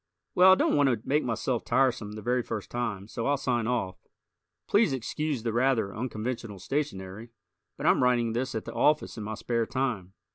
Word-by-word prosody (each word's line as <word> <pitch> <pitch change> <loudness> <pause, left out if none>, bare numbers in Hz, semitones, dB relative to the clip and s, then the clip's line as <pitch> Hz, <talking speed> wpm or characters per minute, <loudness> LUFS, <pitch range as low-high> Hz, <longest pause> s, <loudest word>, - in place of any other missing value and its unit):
Well, 185 +1 +7
I - - +6
don't - - +2
want 145 -2 +4
to 115 -3 -2
make 150 +2 +2
myself 120 +1 -1
tiresome 120 -6 +1
the 105 0 -8
very 125 +1 +1
first 110 -3 -6
time, 105 -5 -3
so 115 +2 -3
I'll 145 0 +2
sign 120 -4 -1
off. 115 -7 -3 0.6
Please 205 -8 +3
excuse 135 +1 -2
the 115 -2 -1
rather 120 -5 +1
unconventional 115 -2 -4
stationary, 100 -2 -4 0.5
but - - -5
I'm - - +4
writing 120 -2 +2
this 130 +2 -2
at 110 - -3
the - - -7
office 150 -5 +1
in - - -5
my 110 +1 -4
spare 115 +1 -1
time. 120 -9 -2
120 Hz, 190 wpm, -28 LUFS, 110-135 Hz, 0.6 s, Well